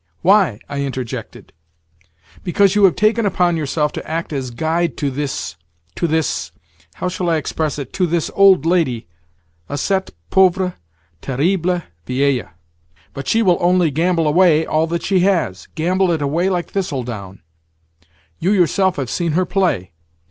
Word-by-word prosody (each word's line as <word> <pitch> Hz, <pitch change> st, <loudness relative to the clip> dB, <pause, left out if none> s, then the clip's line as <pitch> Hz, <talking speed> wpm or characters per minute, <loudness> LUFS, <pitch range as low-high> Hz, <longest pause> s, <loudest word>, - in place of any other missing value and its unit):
Why?" 190 Hz, -, +4 dB
I 140 Hz, -1 st, -4 dB
interjected. 130 Hz, -3 st, -6 dB, 0.9 s
"Because 195 Hz, +2 st, +3 dB
you 205 Hz, -1 st, +5 dB
have 185 Hz, -, +4 dB
taken 220 Hz, +2 st, +2 dB
upon 180 Hz, -3 st, +1 dB
yourself 150 Hz, -1 st, -1 dB
to -, -, -7 dB
act 165 Hz, 0 st, -3 dB
as 135 Hz, -3 st, -3 dB
guide 160 Hz, +6 st, -1 dB
to 140 Hz, -2 st, -1 dB
this, 135 Hz, -9 st, -4 dB, 0.4 s
to 170 Hz, -, -1 dB
this—how 85 Hz, -, -4 dB
shall 180 Hz, -1 st, -2 dB
I 165 Hz, -, +2 dB
express 155 Hz, -1 st, -2 dB
it?—to 150 Hz, +6 st, -2 dB
this 170 Hz, -1 st, -1 dB
old 195 Hz, -6 st, +5 dB
lady, 160 Hz, -, +1 dB, 0.6 s
à 145 Hz, -, -3 dB
cette 190 Hz, +6 st, 0 dB, 0.2 s
pauvre 185 Hz, -1 st, +3 dB, 0.5 s
terrible 175 Hz, +6 st, 0 dB, 0.2 s
vieille. 130 Hz, -3 st, 0 dB, 0.6 s
But 140 Hz, -1 st, -7 dB
she 225 Hz, 0 st, +3 dB
will 180 Hz, -4 st, +3 dB
only 175 Hz, -2 st, +3 dB
gamble 165 Hz, +2 st, +1 dB
away 160 Hz, 0 st, +4 dB
all 160 Hz, +1 st, +1 dB
that 170 Hz, +1 st, -3 dB
she 190 Hz, -2 st, +2 dB
has—gamble 180 Hz, -, 0 dB
it 165 Hz, -3 st, 0 dB
away 165 Hz, +7 st, +1 dB
like 180 Hz, -2 st, -2 dB
thistledown. 120 Hz, -, -4 dB, 1.0 s
You 190 Hz, +5 st, +1 dB
yourself 190 Hz, 0 st, +2 dB
have 135 Hz, -3 st, -3 dB
seen 170 Hz, -3 st, -1 dB
her 185 Hz, +3 st, +2 dB
play. 175 Hz, -, 0 dB
165 Hz, 145 wpm, -19 LUFS, 140-185 Hz, 1.0 s, you